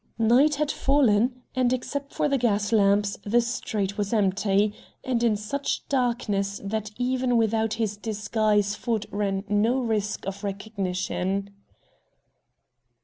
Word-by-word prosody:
Night 245 Hz, +7 st, +4 dB
had 300 Hz, 0 st, 0 dB
fallen, 250 Hz, -2 st, +2 dB
and, 255 Hz, -1 st, +2 dB
except 280 Hz, +3 st, -3 dB
for -, -, 0 dB
the 275 Hz, -2 st, +1 dB
gas 205 Hz, -3 st, +1 dB
lamps, 200 Hz, -1 st, +3 dB
the 225 Hz, +4 st, +3 dB
street 215 Hz, -4 st, -2 dB
was 205 Hz, -1 st, -1 dB
empty, 200 Hz, 0 st, +2 dB, 0.3 s
and 250 Hz, -3 st, 0 dB
in 230 Hz, -3 st, +3 dB
such 230 Hz, +7 st, -3 dB
darkness 230 Hz, -7 st, 0 dB
that 215 Hz, +1 st, -3 dB
even 250 Hz, 0 st, +1 dB
without 220 Hz, -1 st, +1 dB
his 215 Hz, -3 st, -2 dB
disguise 210 Hz, -1 st, 0 dB
Ford 220 Hz, -1 st, -2 dB
ran 195 Hz, -1 st, -1 dB
no 215 Hz, +5 st, +2 dB
risk 215 Hz, -4 st, -2 dB
of 195 Hz, +1 st, -5 dB
recognition. 195 Hz, -1 st, -3 dB
215 Hz, 130 wpm, -25 LUFS, 200-245 Hz, 0.3 s, Night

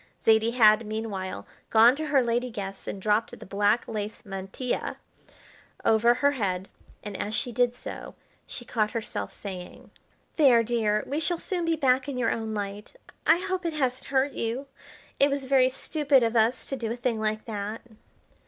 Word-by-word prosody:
Zaidie 225 Hz, +1 st, +4 dB
had, 215 Hz, -2 st, +6 dB
meanwhile, 210 Hz, -4 st, -4 dB, 0.2 s
gone 230 Hz, +3 st, +6 dB
to 310 Hz, +1 st, -4 dB
her 280 Hz, -3 st, +3 dB
lady 240 Hz, +1 st, 0 dB
guest 195 Hz, -4 st, -6 dB
and 200 Hz, -, -4 dB
dropped 210 Hz, +3 st, 0 dB
the -, -, -11 dB
black 205 Hz, +4 st, +1 dB
lace 215 Hz, -1 st, -5 dB
mantilla 195 Hz, +5 st, -4 dB, 0.9 s
over 230 Hz, +2 st, +4 dB
her 285 Hz, +3 st, +3 dB
head, 195 Hz, -8 st, -2 dB, 0.3 s
and, 205 Hz, -1 st, -6 dB
as 210 Hz, +3 st, -3 dB
she 245 Hz, 0 st, 0 dB
did 245 Hz, +1 st, +1 dB
so, -, -, -8 dB, 0.3 s
she 240 Hz, -, -7 dB
caught 215 Hz, -3 st, 0 dB
herself 230 Hz, -2 st, -4 dB
saying: 185 Hz, -3 st, -9 dB, 0.5 s
"There, 255 Hz, -7 st, +6 dB
dear, 215 Hz, -2 st, +1 dB
we 285 Hz, +3 st, -2 dB
shall 345 Hz, +2 st, 0 dB
soon 350 Hz, 0 st, -3 dB
be 330 Hz, 0 st, +2 dB
back 265 Hz, -2 st, +2 dB
in 270 Hz, -, -4 dB
your 240 Hz, -2 st, +1 dB
own 220 Hz, -1 st, -3 dB
light. 205 Hz, -, -5 dB, 0.3 s
I 320 Hz, -, +7 dB
hope 370 Hz, -1 st, -2 dB
it 335 Hz, -2 st, -2 dB
hasn't 260 Hz, -4 st, -1 dB
hurt 275 Hz, +1 st, +1 dB
you. 235 Hz, +4 st, -3 dB, 0.5 s
It 280 Hz, -, +5 dB
was 280 Hz, -1 st, -2 dB
very 260 Hz, -1 st, +4 dB
stupid 275 Hz, 0 st, +2 dB
of 230 Hz, 0 st, 0 dB
us 230 Hz, +3 st, +2 dB
to 270 Hz, -, -1 dB
do 230 Hz, -4 st, -4 dB
a -, -, -2 dB
thing 240 Hz, -2 st, -1 dB
like 215 Hz, 0 st, -2 dB
that." 210 Hz, 0 st, -4 dB
230 Hz, 180 wpm, -27 LUFS, 215-265 Hz, 0.9 s, I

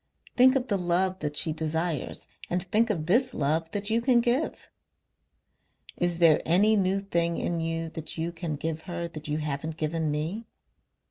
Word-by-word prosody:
"Think 260 Hz, +2 st, +6 dB
of 265 Hz, -1 st, 0 dB
the 200 Hz, -4 st, 0 dB
love 180 Hz, +2 st, +1 dB
that 150 Hz, -1 st, -3 dB
she 160 Hz, -, +2 dB
desires 160 Hz, 0 st, -2 dB, 0.2 s
and 180 Hz, 0 st, 0 dB
think 220 Hz, +5 st, +2 dB
of 165 Hz, -8 st, -1 dB
this 245 Hz, +8 st, +3 dB
love 155 Hz, +3 st, 0 dB
that 205 Hz, +2 st, -3 dB
you 230 Hz, +1 st, +2 dB
can 240 Hz, 0 st, +4 dB
give.... 245 Hz, +6 st, -1 dB, 1.2 s
"Is 175 Hz, -1 st, 0 dB
there 165 Hz, -3 st, +5 dB
any 200 Hz, +6 st, +4 dB
new 195 Hz, -1 st, +1 dB
thing 170 Hz, -3 st, 0 dB
in 170 Hz, -1 st, -1 dB
you 165 Hz, 0 st, -2 dB
that 160 Hz, 0 st, -7 dB
you 165 Hz, +1 st, -2 dB
can 165 Hz, -2 st, -4 dB
give 160 Hz, +2 st, -4 dB
her 170 Hz, -1 st, -3 dB
that 155 Hz, -3 st, -9 dB
you 150 Hz, 0 st, -1 dB
haven't 155 Hz, +1 st, -4 dB
given 155 Hz, 0 st, -1 dB
me? 165 Hz, +10 st, -3 dB
170 Hz, 180 wpm, -27 LUFS, 160-200 Hz, 1.2 s, Think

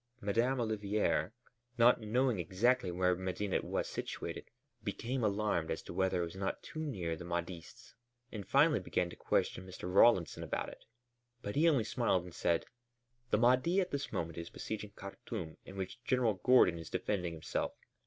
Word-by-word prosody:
Madame 120 Hz, +5 st, +1 dB
Olivier, 105 Hz, -6 st, 0 dB, 0.5 s
not 120 Hz, 0 st, +6 dB
knowing 120 Hz, 0 st, +1 dB
exactly 100 Hz, +5 st, +2 dB
where 90 Hz, +1 st, +2 dB
Medinet 95 Hz, +2 st, -2 dB
was -, -, -2 dB
situated, -, -, -5 dB, 0.3 s
became 115 Hz, +4 st, -2 dB
alarmed 100 Hz, -6 st, +1 dB
as 80 Hz, -, -3 dB
to -, -, -8 dB
whether 95 Hz, -1 st, +1 dB
it -, -, 0 dB
was 85 Hz, -, -9 dB
not 95 Hz, 0 st, -3 dB
too 155 Hz, -, -7 dB
near 95 Hz, -, -2 dB
the 80 Hz, -, -8 dB
Mahdists, 85 Hz, 0 st, -5 dB, 0.4 s
and 105 Hz, -3 st, -6 dB
finally 145 Hz, -1 st, +5 dB
began 90 Hz, -1 st, -1 dB
to -, -, -9 dB
question -, -, 0 dB
Mr. 95 Hz, -, -10 dB
Rawlinson 100 Hz, -4 st, +5 dB
about -, -, -2 dB
it. -, -, -14 dB, 0.6 s
But 100 Hz, -, -4 dB
he 160 Hz, +4 st, +5 dB
only 135 Hz, -8 st, +3 dB
smiled 110 Hz, -5 st, +1 dB
and 90 Hz, -1 st, -10 dB
said: 85 Hz, -1 st, +1 dB, 0.6 s
"The -, -, +3 dB
Mahdi 130 Hz, -, +4 dB
at 185 Hz, -2 st, 0 dB
this 140 Hz, -1 st, -3 dB
moment 85 Hz, 0 st, -3 dB
is 85 Hz, -, -6 dB
besieging 105 Hz, -1 st, -5 dB
Khartûm 100 Hz, -4 st, -7 dB
in 95 Hz, -, -10 dB
which 95 Hz, +5 st, -5 dB
General 125 Hz, -3 st, +2 dB
Gordon 95 Hz, -3 st, +4 dB
is 80 Hz, -, -8 dB
defending 90 Hz, -5 st, -1 dB
himself. 80 Hz, -1 st, -2 dB
100 Hz, 170 wpm, -34 LUFS, 90-120 Hz, 0.6 s, not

